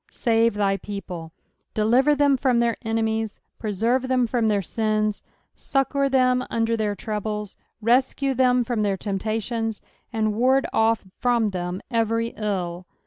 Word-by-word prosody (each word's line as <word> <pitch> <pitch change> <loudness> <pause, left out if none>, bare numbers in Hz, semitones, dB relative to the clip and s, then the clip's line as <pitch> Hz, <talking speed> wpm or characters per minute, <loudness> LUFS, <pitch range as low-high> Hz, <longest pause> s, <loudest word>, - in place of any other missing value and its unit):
" - - -34 0.2
Save 230 -2 +3
thy 200 -1 +1
people." 180 -6 -7 0.4
Deliver 245 +7 +4
tbem 285 -2 +3
from 250 -3 +2
their 235 -1 +2
enemies, 225 -1 -1 0.2
preserve 230 +5 0
them 255 -1 +2
from 235 -1 0
their 205 -2 +1
sins, 215 +1 0 0.3
succour 275 0 0
them 255 -1 +3
under 230 0 +1
their 210 -2 -1
troubles, 210 -1 -4 0.3
rescue 265 +3 +2
tbem 250 -1 +3
from 230 -2 -1
their 200 -2 +1
temptations, 220 +3 -2 0.3
and 215 -2 0
ward 260 +5 +3
off 225 -1 +2
from 235 -4 +2
tbem 180 0 -4
every 230 0 +1
ill. 185 -5 -3
225 Hz, 140 wpm, -24 LUFS, 210-245 Hz, 0.4 s, Deliver